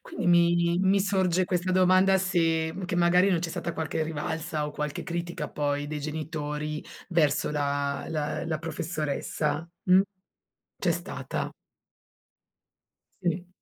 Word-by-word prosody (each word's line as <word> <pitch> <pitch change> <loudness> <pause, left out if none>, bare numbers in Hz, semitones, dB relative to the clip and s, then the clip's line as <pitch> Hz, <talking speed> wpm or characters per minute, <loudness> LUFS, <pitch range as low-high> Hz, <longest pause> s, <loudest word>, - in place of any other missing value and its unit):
Quindi - - -5
mi 170 0 +4
mi 195 +1 +4
sorge 185 -2 +2
questa 180 0 -1
domanda, 185 +1 +5
se 165 -3 +1
che 175 - -2
magari 180 +2 +5
non 180 - +3
c'è 170 - -2
stata 170 +1 -3
qualche 160 0 -2
rivalsa 155 0 -2
o 150 - -5
qualche 150 -1 -3
critica, 170 -1 -4
poi, 145 0 -1
dei 150 0 -4
genitori, 150 0 -4 0.2
verso 165 -6 +2
la 140 -1 -1
la 150 -2 -2
la 160 -2 -1
professoressa, 160 0 -2 0.2
mh? 185 +1 +6 0.8
C'è - - +1
stata. - - -4 1.7
Sì. 175 0 -1
165 Hz, 130 wpm, -27 LUFS, 150-180 Hz, 1.7 s, mh